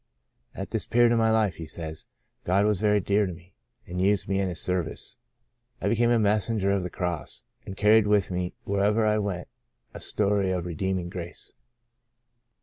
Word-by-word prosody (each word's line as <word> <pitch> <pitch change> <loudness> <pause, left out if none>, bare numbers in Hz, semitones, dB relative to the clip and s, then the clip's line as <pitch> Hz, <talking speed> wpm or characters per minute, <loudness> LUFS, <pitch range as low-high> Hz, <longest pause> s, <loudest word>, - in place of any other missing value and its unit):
At - - -6
this - - -2
period 120 0 +4
of 120 - +3
my 110 0 +3
life/' 110 -4 +2
he 80 - -7
says, 80 -1 -7 0.2
'' - - -49
God 95 +3 +2
was 105 -3 +2
very 105 -1 +4
dear 100 +2 +1
to 90 - -4
me, 85 +2 -16 0.3
and 90 +1 -4
used 100 +1 +2
me 95 -1 0
in 95 -1 0
His 85 -4 -5
service. 90 +4 -3 0.6
I - - -2
became 115 +1 +3
a 120 - +4
messenger 105 -1 +1
of 100 -1 +1
the 90 - -4
Cross, 90 -4 -4 0.2
and 95 - -7
carried 105 +1 +5
with 105 -2 +2
me 90 0 -3
wherever 105 +3 +2
I 105 0 +2
went 95 -4 -3 0.5
a - - -8
story 100 -2 +1
of 90 -2 -2
redeem 95 +3 -1
ing 90 -1 -4
grace." 85 -1 -7
100 Hz, 195 wpm, -26 LUFS, 90-105 Hz, 0.6 s, carried